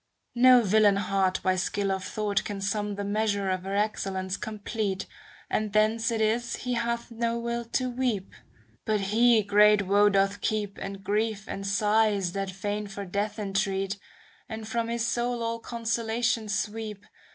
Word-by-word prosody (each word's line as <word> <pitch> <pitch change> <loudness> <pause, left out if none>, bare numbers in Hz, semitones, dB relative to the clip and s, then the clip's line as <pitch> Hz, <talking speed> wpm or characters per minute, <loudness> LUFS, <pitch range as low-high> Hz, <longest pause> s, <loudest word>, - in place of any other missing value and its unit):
No 250 0 +7
villain 205 0 +4
heart 195 -1 +1
by 185 -1 +2
skill 195 +2 -1
of 190 -1 -2
thought 210 -2 -1
can 205 -1 -5
sum 205 +1 -1
The 200 - -4
measure 205 -1 0
of 185 -1 -1
her 195 +1 -2
excellence 195 -3 -1
complete. 210 -1 -3 0.4
And 215 -2 -1
thence 220 +1 +2
it 230 -1 -1
is 230 +2 +1
he 250 0 -3
hath 235 0 -2
no 230 0 -1
will 235 0 -2
to 255 +2 -1
weep; 245 -6 -2 0.5
But 215 -2 +1
he 220 +3 +4
great 210 0 +5
woe 205 +2 +5
doth 195 0 +1
keep, 210 -2 -2
And 195 0 -6
grief 210 +1 -1
and 195 0 -5
sighs 205 -2 +2
that 195 +1 -3
fain 205 +2 -3
for 200 0 -6
death 205 +3 -2
entreat, 195 -1 -1 0.5
And 220 -1 -6
from 230 +1 -1
his 235 0 -1
soul 240 0 -1
all 230 0 -2
consolation 230 -1 -1
sweep. 210 -1 -3
210 Hz, 165 wpm, -27 LUFS, 195-230 Hz, 0.5 s, No